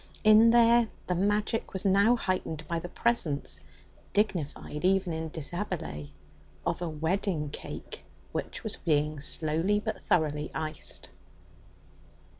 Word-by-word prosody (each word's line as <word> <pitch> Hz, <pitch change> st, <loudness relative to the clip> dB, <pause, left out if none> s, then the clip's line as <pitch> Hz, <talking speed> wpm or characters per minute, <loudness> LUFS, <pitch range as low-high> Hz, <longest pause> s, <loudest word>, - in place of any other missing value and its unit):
In 215 Hz, +1 st, +8 dB
there 235 Hz, 0 st, +6 dB, 0.2 s
the 180 Hz, -, 0 dB
magic 205 Hz, +4 st, 0 dB
was 190 Hz, +1 st, -2 dB
now 200 Hz, +5 st, +5 dB
heightened 185 Hz, -7 st, -2 dB
by 170 Hz, -1 st, -1 dB
the 175 Hz, -, -7 dB
presence 175 Hz, -, 0 dB, 0.5 s
dignified 170 Hz, -7 st, -1 dB
even 190 Hz, -1 st, +2 dB
in 160 Hz, 0 st, -3 dB
deshabille 160 Hz, -, -3 dB, 0.6 s
of -, -, -1 dB
a 175 Hz, -, -1 dB
wedding 160 Hz, 0 st, -1 dB
cake -, -, -8 dB, 0.3 s
which -, -, -4 dB
was 220 Hz, -, -3 dB
being 150 Hz, -2 st, +1 dB
slowly 165 Hz, +7 st, +1 dB
but 215 Hz, +1 st, -4 dB
thoroughly 150 Hz, -2 st, +1 dB
iced. 155 Hz, -1 st, -5 dB
175 Hz, 120 wpm, -29 LUFS, 155-205 Hz, 0.6 s, In